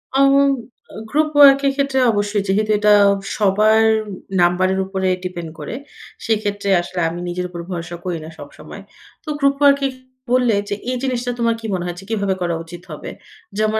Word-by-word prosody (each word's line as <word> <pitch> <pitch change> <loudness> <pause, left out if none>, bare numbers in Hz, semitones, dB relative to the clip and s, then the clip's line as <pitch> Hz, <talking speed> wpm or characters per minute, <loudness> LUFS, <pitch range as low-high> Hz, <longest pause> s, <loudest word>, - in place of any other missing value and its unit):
আম 275 0 +5 0.6
আ - - -11
group 305 +1 +1
work 275 -1 +8
এর 275 - +3
ক্ষেত্রে 275 -1 0
অবশ্যই 205 -1 -1
যেহেতু 215 +2 +1
এটা 210 0 +5 0.4
সবার 215 +2 +3 0.6
নাম্বারের 185 +2 +2
উপরে 190 -1 -2 0.2
ডিপেন্ড 175 -3 -5
করে, - - -6 0.5
সেক্ষেত্রে 205 -2 -1
আসলে 175 +1 -6
আমি 170 - -6
নিজের 180 +1 -3
উপর 175 -1 -8
ভরসা 175 0 -5
করি 180 -2 -2
না - - -9
সবসময়। - - -11 0.4
তো 310 - -8
গ্রুপ 280 -1 +3
ওয়ার্কে 280 -1 +4 0.5
বললে 245 -5 +2
যে, 205 - -1 0.2
"এই 255 - -2
জিনিসটা 250 -2 -1
তোমার 230 -1 +1
কি - - -9
মনে 180 -1 -2
হয় 175 -1 -4
যে, - - -12
কিভাবে 200 -3 -1
করা 175 -1 -1
উচিত 170 +1 -11
হবে?" 150 - -7 0.5
যেমন 215 0 +1
205 Hz, 175 wpm, -19 LUFS, 180-250 Hz, 0.6 s, work